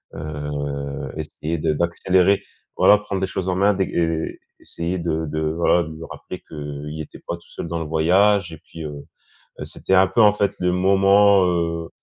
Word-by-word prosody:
heu, 70 -2 -5
essayer 80 +2 -4
de 75 - +1
d'accélérer, 90 +4 +2 0.3
voilà, 105 - +6
prendre 100 -2 -4
les 95 - 0
choses 95 -1 -4
en 90 - 0
main, 100 +1 +3
et 80 -3 -1 0.2
essayer 85 +2 -4
de 80 -1 -2
de, 80 +1 -3
voilà, 85 +2 +2
de 80 -1 -8
lui 80 +1 -9
rappeler - - -9
qu'il 75 0 -7
était 80 - -8
pas 85 - -3
tout 85 - -18
seul - - -7
dans 85 - -2
le 80 - -4
voyage 95 +5 +3
et 80 - -9
puis, 80 0 -11
heu, 75 -1 -7 0.6
c'était 95 - -2
un 95 +1 +6
peu 115 - 0
en 105 -1 +7
fait 100 -1 0
le 90 - +2
moment, 100 +1 +5
heu, 85 -2 -1
85 Hz, 185 wpm, -22 LUFS, 80-95 Hz, 0.6 s, en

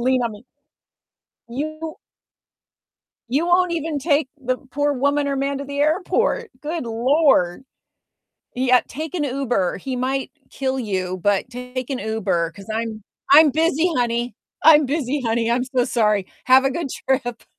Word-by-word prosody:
lean 255 0 +2
on 230 -2 -1
me?" 210 +4 -13 1.0
You 310 +5 -5 1.3
you 290 +7 +1
won't 355 0 +3
even 320 -2 -2
take 285 -1 +1 0.2
the 255 +1 +1
poor 290 +1 +1
woman 285 +2 +1
or 275 - -1
man 275 0 -1
to 280 - -5
the 280 +1 -6
airport. 365 +9 +1
Good 315 -1 -4
Lord. 240 - +2 0.9
Yeah, 255 0 +4
"Take 315 +4 -6
an 310 -5 0
Uber, 245 -9 -1
he 260 +5 -4
might 265 +2 -2 0.2
kill 265 -1 -2
you, 185 -4 -3
but 205 +3 +1
take 250 0 -6
an 260 - -2
Uber, 195 -7 -1
'cause 195 +3 -13
I'm 220 -2 -3 0.3
I'm 305 +1 +8
busy, 325 +3 +1
honey. 240 -1 -1 0.3
I'm 305 -2 +7
busy, 280 -1 -1
honey. 230 0 0
I'm 245 +1 +2
so 255 -2 0
sorry. 210 -6 +1 0.2
Have 260 +1 +6
a 270 - +2
good 310 0 -3
trip." 245 -3 -2
260 Hz, 155 wpm, -21 LUFS, 235-295 Hz, 1.3 s, I'm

